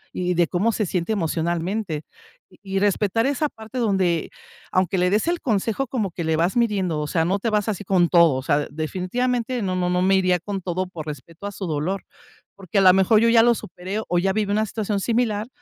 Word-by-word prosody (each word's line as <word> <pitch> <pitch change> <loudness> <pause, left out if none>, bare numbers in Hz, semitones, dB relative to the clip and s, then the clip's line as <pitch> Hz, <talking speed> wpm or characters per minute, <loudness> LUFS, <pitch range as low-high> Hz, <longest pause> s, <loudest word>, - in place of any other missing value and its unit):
y 180 0 -1
de 175 0 +4
cómo 195 +7 +1
se 215 -1 -1
siente 180 +3 -2
emocionalmente, 170 -1 -2 0.5
y - - -22 0.2
y 195 - +3
respetar 205 +2 +1
esa 285 +2 0
parte 225 +3 -8
donde 190 -6 +1 0.4
aunque 185 0 +1
le 180 - +3
des 210 - +1
el 345 0 0
consejo 225 +3 -1
como 215 -8 -2
que 170 - -5
le 160 0 +1
vas 175 +5 +1
midiendo, 195 -9 +1
o 150 - -3
sea, 165 +2 +1
no 190 +4 0
te 230 +3 -1
vas 210 0 0
así 205 -1 -3
con 180 -3 +2
todo, 170 -5 +5
o 130 - -3
sea, 145 0 +1
definitivamente 235 - -2
no 185 -1 -1
no 180 -1 0
no 180 0 +1
me 190 +1 +3
iría 185 -1 +3
con 195 +2 -5
todo 185 +1 -2
por 160 -4 -8
respeto 155 +6 -8
a - - -5
su 195 -1 -6
dolor, 165 +6 -2 0.5
porque, 195 0 -5
a - - +4
lo 185 -1 +7
mejor, 195 +3 +4
yo 230 - +4
ya 230 -1 +6
lo 240 -1 +4
superé, 190 +4 -5
o 175 - +1
ya 190 +2 +1
viví 210 -1 -1
una 215 +1 +1
situación 210 -1 -2
similar, 225 -1 0
190 Hz, 225 wpm, -23 LUFS, 175-215 Hz, 0.5 s, lo